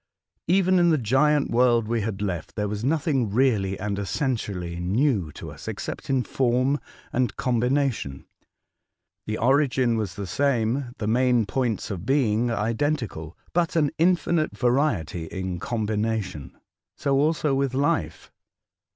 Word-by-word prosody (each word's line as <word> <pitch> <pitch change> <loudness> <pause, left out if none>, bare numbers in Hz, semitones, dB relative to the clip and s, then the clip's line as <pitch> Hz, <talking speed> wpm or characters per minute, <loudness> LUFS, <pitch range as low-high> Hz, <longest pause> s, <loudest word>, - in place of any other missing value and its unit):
Even 185 +1 +4
in 175 0 +4
the 160 - +4
Giant 140 +5 +2
AVorld 120 -1 +3
we 115 0 0
had 105 -1 -3
left 90 -5 -4
there 105 -1 -1
was 105 +1 -4
nothing 140 - +1
really 105 -5 +1
and 100 0 -2
essen 130 +6 0
tially 90 -6 -5
new 100 - +1
to - - -8
us, - - -12
except - - -5
in 135 -2 +2
form 130 +3 +1 0.3
and 125 0 0
combina 125 +2 +1
tion. 70 -10 -7 1.0
The 110 0 -2
origin 130 -2 +2
was 110 -3 -3
the 100 - -5
same, 125 +3 0
the 110 - -4
main 120 +1 +3
points 115 0 -2
of 90 -4 -5
being 120 -3 +2
identical, 115 - -2 0.2
but 170 -1 +1
an 150 -4 +2
infinite 170 -2 +2
variety 120 - 0
in 95 0 -4
combination. 110 - -2 0.4
So 135 -2 +1
also 150 -1 +1
with 135 -1 0
life. 90 - -1
120 Hz, 140 wpm, -25 LUFS, 105-140 Hz, 1.0 s, Even